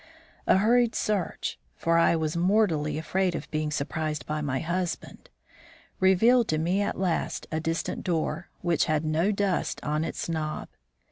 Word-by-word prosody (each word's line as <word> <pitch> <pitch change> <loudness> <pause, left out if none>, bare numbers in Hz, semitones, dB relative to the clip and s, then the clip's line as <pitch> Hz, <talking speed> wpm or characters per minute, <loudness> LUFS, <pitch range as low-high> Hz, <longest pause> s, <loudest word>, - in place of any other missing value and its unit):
A - - +6
hurried 235 +3 +3
search 205 -5 -1 0.2
(for 165 0 +2
I 170 - +4
was 160 0 -1
mortally 170 -5 +2
afraid 180 +3 0
of - - -5
being 155 -1 -1
surprised 150 +1 -2
by 150 0 -2
my 140 -3 -1
husband,) 175 +2 -3 0.7
revealed 220 +6 +5
to 155 - +1
me 175 +5 +1
at 205 - -1
last 180 -3 -1
a 155 - 0
distant 165 +1 -2
door, 165 -1 -1
which 175 -2 +2
had 155 0 0
no 160 +6 +2
dust 200 -2 0
on 150 +1 0
its 165 - -4
knob. 155 -2 -3
165 Hz, 155 wpm, -27 LUFS, 155-190 Hz, 0.7 s, A